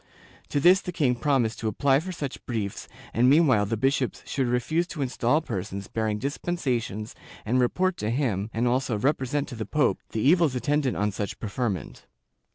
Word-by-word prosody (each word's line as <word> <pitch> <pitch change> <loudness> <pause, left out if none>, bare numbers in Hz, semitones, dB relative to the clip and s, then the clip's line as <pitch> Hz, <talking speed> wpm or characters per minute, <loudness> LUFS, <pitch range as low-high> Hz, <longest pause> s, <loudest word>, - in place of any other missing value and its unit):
To 145 - 0
this 180 +6 +6
the 180 - -5
king 145 -7 +2
promised 125 -3 0
to 110 - -2
apply 135 +6 +3
for 185 +4 -5
such 145 -6 -5
briefs 110 -5 -3 0.3
and 125 +2 +4
meanwhile 135 -9 +4
the 115 +2 -1
bishops 135 +1 0
should 135 -3 -1
refuse 155 +8 0
to 155 -5 -3
install 130 +3 +1
persons 100 - -5
bearing 110 -2 -1
dispensations 125 - -2 0.3
and 125 +4 +2
report 180 +9 +1
to 105 - -2
him, 115 -5 -1
and 115 +2 0
also 125 -2 +1
repre 130 +3 0
sent 145 +2 -1
to 125 - -7
the 110 - -3
pope 150 -3 +1
the 110 - -3
evils 160 0 +4
attendant 145 0 0
on 105 0 +1
such 100 0 -4
preferment. 105 -3 -4
125 Hz, 180 wpm, -26 LUFS, 110-145 Hz, 0.3 s, this